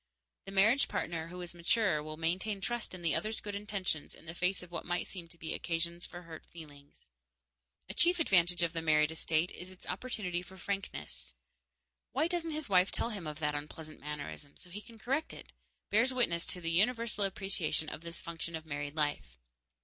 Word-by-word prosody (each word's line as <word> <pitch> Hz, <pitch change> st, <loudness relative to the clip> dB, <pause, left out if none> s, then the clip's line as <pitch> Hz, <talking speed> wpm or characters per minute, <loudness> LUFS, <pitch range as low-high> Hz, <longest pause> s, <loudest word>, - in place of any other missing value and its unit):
The 195 Hz, -, -6 dB
marriage 215 Hz, +8 st, +5 dB
partner 165 Hz, -1 st, -1 dB
who 180 Hz, +2 st, -7 dB
is 175 Hz, -, -7 dB
mature 175 Hz, -1 st, +3 dB
will 155 Hz, +1 st, -6 dB
maintain 185 Hz, +6 st, 0 dB
trust 235 Hz, -1 st, -2 dB
in 175 Hz, -, -9 dB
the 165 Hz, -, +3 dB
other's 215 Hz, +1 st, 0 dB
good 205 Hz, -, -5 dB
intentions 200 Hz, -6 st, -1 dB
in -, -, -15 dB
the 165 Hz, -, -5 dB
face 180 Hz, +2 st, +1 dB
of 175 Hz, -, -12 dB
what 170 Hz, -, -3 dB
might 175 Hz, 0 st, 0 dB
seem 175 Hz, -3 st, -6 dB
to 170 Hz, 0 st, -16 dB
be 160 Hz, -1 st, -3 dB
occasions 170 Hz, +1 st, 0 dB
for 175 Hz, 0 st, -8 dB
hurt 165 Hz, -2 st, -9 dB
feelings. 145 Hz, -4 st, -13 dB, 0.8 s
A 190 Hz, -, -4 dB
chief 350 Hz, -, +5 dB
advantage 175 Hz, -, +5 dB
of 170 Hz, 0 st, +1 dB
the 165 Hz, -, -1 dB
married 155 Hz, -1 st, +4 dB
estate 160 Hz, +1 st, +1 dB
is 180 Hz, -, -7 dB
its 185 Hz, -1 st, -11 dB
opportunity 185 Hz, -3 st, -2 dB
for 190 Hz, +1 st, -12 dB
frankness. 75 Hz, -, -3 dB, 0.8 s
"Why 295 Hz, +5 st, +3 dB
doesn't 340 Hz, -1 st, -1 dB
his 310 Hz, -1 st, -1 dB
wife 185 Hz, -1 st, +5 dB
tell 235 Hz, -, 0 dB
him 195 Hz, -7 st, -5 dB
of 150 Hz, -1 st, -4 dB
that 150 Hz, -1 st, +2 dB
unpleasant 155 Hz, +1 st, -5 dB
mannerism, 145 Hz, -, -6 dB
so 180 Hz, -, -10 dB
he 205 Hz, +4 st, -5 dB
can 230 Hz, +1 st, -13 dB
correct 270 Hz, +8 st, 0 dB
it?" -, -, -11 dB, 0.4 s
bears 230 Hz, +5 st, +5 dB
witness 205 Hz, -10 st, +3 dB
to 180 Hz, -, +1 dB
the 165 Hz, -1 st, 0 dB
universal 220 Hz, +3 st, +3 dB
appreciation 195 Hz, -5 st, 0 dB
of 150 Hz, -, -5 dB
this 170 Hz, 0 st, -7 dB
function 170 Hz, 0 st, -4 dB
of 160 Hz, 0 st, -5 dB
married 145 Hz, -1 st, -3 dB
life. 145 Hz, -, 0 dB
175 Hz, 200 wpm, -34 LUFS, 160-200 Hz, 0.8 s, marriage